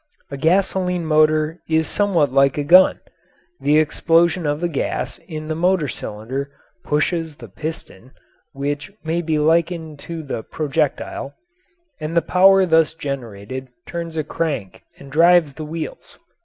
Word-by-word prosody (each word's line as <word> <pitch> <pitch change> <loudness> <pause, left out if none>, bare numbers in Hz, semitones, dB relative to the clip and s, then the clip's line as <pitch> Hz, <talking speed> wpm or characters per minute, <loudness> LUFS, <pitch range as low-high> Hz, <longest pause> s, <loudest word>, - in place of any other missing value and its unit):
A - - -4
gasoline 180 +2 +1
motor 155 +1 +2
is 160 0 +2
somewhat 170 -10 +1
like 135 0 +3
a 145 - 0
gun 180 +6 +6 0.6
the 150 +1 +3
explosion 165 +2 +2
of 145 0 0
the 175 - 0
gas 155 -5 -3
in 155 -3 -8
the 160 - -1
motor 175 -1 +1
cylinder 130 +4 -5 0.3
pushes 160 +1 -1
the 120 -4 -11
piston 130 - -7 0.4
(which 145 +5 -4
may 165 +2 -1
be 160 -2 -1
likened 160 0 0
to 165 0 -7
the 135 -5 -4
projectile), 145 -1 -2 0.6
and 155 +2 -3
the 170 - +4
power 190 +2 +5
thus 160 -2 +3
generated 130 -4 -6 0.2
turns 170 -1 -5
a 155 - 0
crank 140 - -4
and 140 -1 -13
drives 165 -1 +5
the 155 +2 -7
wheels. 160 +1 -7
155 Hz, 140 wpm, -20 LUFS, 140-170 Hz, 0.6 s, gun